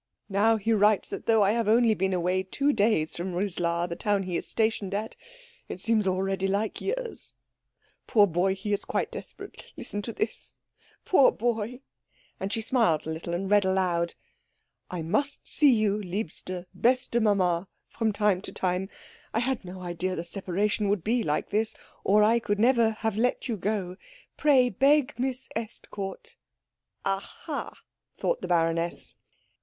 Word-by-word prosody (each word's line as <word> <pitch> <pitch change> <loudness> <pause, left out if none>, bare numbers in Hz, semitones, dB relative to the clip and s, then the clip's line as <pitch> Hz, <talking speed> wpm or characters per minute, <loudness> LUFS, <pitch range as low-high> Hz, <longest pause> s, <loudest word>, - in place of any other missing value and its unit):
"Now 215 +3 +3
he 220 +2 +1
writes 210 -1 +3
that - - -6
though 225 -2 +5
I 200 - +4
have 230 -1 0
only 230 +1 +5
been 190 -1 0
away 180 +1 +1
two 280 +10 0
days 205 - +1
from 175 +1 -4
Rislar, 175 -2 0
the 170 - -4
town 205 0 0
he 180 -2 -4
is - - -2
stationed 220 -3 0
at, 215 +2 -3 0.5
it - - -5
seems 215 0 +2
already 190 +1 0
like 200 +3 -1
years. 480 +2 -4 0.7
Poor 210 -3 +6
boy! 190 +1 +1
He 205 +2 -3
is 200 - 0
quite - - -2
desperate - - -9
listen 205 - -3
to 220 - -5
this 220 0 -4 0.5
poor 280 -8 +6
boy 235 +1 -2 0.3
" - - -36
And 195 +1 -3
she 225 - -1
smiled 225 - +2
a 160 - -3
little, 170 +2 -4
and 190 +2 -2
read 205 0 +4
aloud, 180 -3 0 0.7
"'I 175 -3 -4
must 245 - -1
see 290 -3 +5
you, 215 -3 +2
liebste, 185 -2 -5 0.2
beste 245 -1 +2
Mama, 185 -4 +2 0.2
from 225 -2 -1
time 205 -3 +1
to - - -8
time. 185 +1 -1 0.5
I - - +3
had 255 -1 -1
no 185 0 -8
idea 180 +1 -3
the 165 - -3
separation 200 +3 -1
would 200 -4 0
be 235 +3 +1
like 150 -7 -1
this, 220 +2 0 0.3
or 210 +2 +5
I 230 +2 +4
could 205 -3 -1
never 230 0 +4
have 220 -3 0
let 250 +4 0
you 235 - -1
go. 190 -2 -2 0.4
Pray 270 -4 +4
beg 275 +5 +3
Miss 260 0 -2
Estcourt 220 - -6 0.3
'" - - -31
"Aha," 195 0 -4 0.4
thought - - -1
the - - -4
baroness. 165 0 0
205 Hz, 170 wpm, -27 LUFS, 185-225 Hz, 0.7 s, Poor